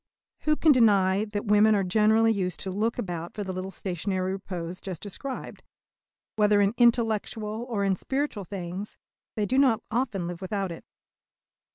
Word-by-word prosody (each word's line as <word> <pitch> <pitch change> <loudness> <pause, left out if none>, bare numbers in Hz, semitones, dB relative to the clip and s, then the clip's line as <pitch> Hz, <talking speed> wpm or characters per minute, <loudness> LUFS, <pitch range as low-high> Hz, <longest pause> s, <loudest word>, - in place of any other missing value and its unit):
Who 305 0 +4
can 315 0 +4
deny 205 -5 +4
that 210 0 -4
women 210 +1 +5
are 200 - +1
generally 220 +4 +4
used 185 -4 -2
to 190 - -4
look 215 +5 -1
about 175 -7 -5
for 210 - -3
the 190 -1 -4
little 185 +1 -4
stationary 185 0 -2
repose 185 -2 -5
just 185 -5 -6
described? 255 +6 -7 0.8
Whether 210 -1 +4
in 200 +1 +3
intellectual 225 -1 +1
or 210 -4 -1
in 195 -1 +2
spiritual 265 -2 -2
things, 185 +2 -6 0.4
they 210 - 0
do 260 +6 +1
not 245 -5 +3
often 230 -6 -1
live 175 +1 -6
without 195 -1 -2
it. 165 - -9
205 Hz, 165 wpm, -27 LUFS, 185-225 Hz, 0.8 s, women